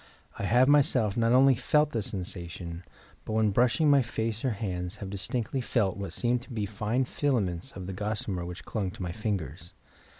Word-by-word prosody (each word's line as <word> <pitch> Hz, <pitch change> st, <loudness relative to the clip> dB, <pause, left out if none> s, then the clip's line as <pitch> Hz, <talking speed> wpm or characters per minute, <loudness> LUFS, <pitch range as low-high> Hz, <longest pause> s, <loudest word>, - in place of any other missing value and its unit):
I -, -, -1 dB
have 120 Hz, +6 st, +4 dB
myself 135 Hz, -7 st, +4 dB
not 115 Hz, 0 st, +2 dB
only 135 Hz, +2 st, +6 dB
felt 150 Hz, +5 st, +2 dB
the 115 Hz, -, -1 dB
sensation, 90 Hz, -3 st, -6 dB, 0.4 s
but -, -, -5 dB
when 110 Hz, -1 st, +3 dB
brushing 125 Hz, -, +3 dB
my 140 Hz, -1 st, +6 dB
face 115 Hz, -1 st, -3 dB
or 130 Hz, -, +2 dB
hands 95 Hz, -4 st, -3 dB
have 100 Hz, -2 st, -7 dB
distinctly 115 Hz, +6 st, -2 dB
felt 110 Hz, -6 st, +1 dB
what 100 Hz, -3 st, -5 dB
seemed 120 Hz, +5 st, 0 dB
to 130 Hz, -, -14 dB
be 110 Hz, -3 st, -2 dB
fine 110 Hz, +5 st, -1 dB
filaments 105 Hz, -, -1 dB
of 95 Hz, -, -7 dB
the 95 Hz, -, -5 dB
gossamer 105 Hz, -2 st, -3 dB
which 90 Hz, +1 st, -7 dB
clung 100 Hz, -4 st, -2 dB
to 90 Hz, -, -7 dB
my 90 Hz, -, -3 dB
fingers. 90 Hz, -5 st, -4 dB
105 Hz, 190 wpm, -29 LUFS, 95-120 Hz, 0.4 s, only